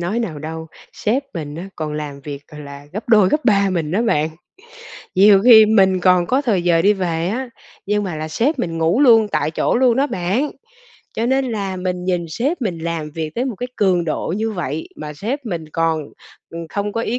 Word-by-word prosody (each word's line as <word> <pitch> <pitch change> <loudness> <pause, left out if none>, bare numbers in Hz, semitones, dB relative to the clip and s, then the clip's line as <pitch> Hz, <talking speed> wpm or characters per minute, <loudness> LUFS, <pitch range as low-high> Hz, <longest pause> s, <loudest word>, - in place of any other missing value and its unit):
nói 180 +7 -1
nào 175 -10 -3
đâu, 160 +2 -6 0.3
sếp 245 +6 -1
mình 150 -3 -5
á 180 +4 -7
còn 155 -1 -4
làm 150 -2 -5
việc 140 0 -7
c - - -27
là 140 -1 -10
gấp 210 +5 -6
2 210 -5 +5
gấp 300 +5 0
3 200 -4 +3
mình 165 -5 -2
đó 200 +7 +1
bạn. 155 -10 +1 0.9
Nhiều 195 +1 +6
khi 220 -3 +9
mình 190 -4 +3
còn 180 -1 +4
có 265 +8 +1
thời 205 -9 +1
giờ 170 -2 +3
đi 205 +3 +5
về 175 -3 -2
á, 250 +4 -3 0.4
nhưng 210 0 +1
mà 175 -5 -4
là 155 +1 -4
sếp 265 - 0
mình 165 -7 -2
ngủ 165 +9 +2
luôn 225 -6 +6
tại 155 - -1
chỗ 160 - 0
luôn 245 -2 +3
đó 275 +2 +2
bạn. 200 +9 -1 0.6
Cho 230 - -1
nên 265 +2 +2
là 195 -3 -3
mình 180 -1 -3
nhìn 180 -2 -1
sếp 275 - -2
mình 180 -6 -2
làm 160 -2 -4
việc 155 0 -4
cái 245 - -1
một 250 -7 -4
cái 250 - -4
cường 185 -4 +2
độ 165 +2 -2
như 225 +1 -1
vậy 160 -5 -4
mà 150 0 -7
sếp 245 - -4
mình 165 -6 -4
còn, 165 -1 0 0.5
ừm, 165 -1 -7
không 205 +2 -3
có 230 - -2
ý 235 +2 -2
185 Hz, 225 wpm, -19 LUFS, 160-225 Hz, 0.9 s, khi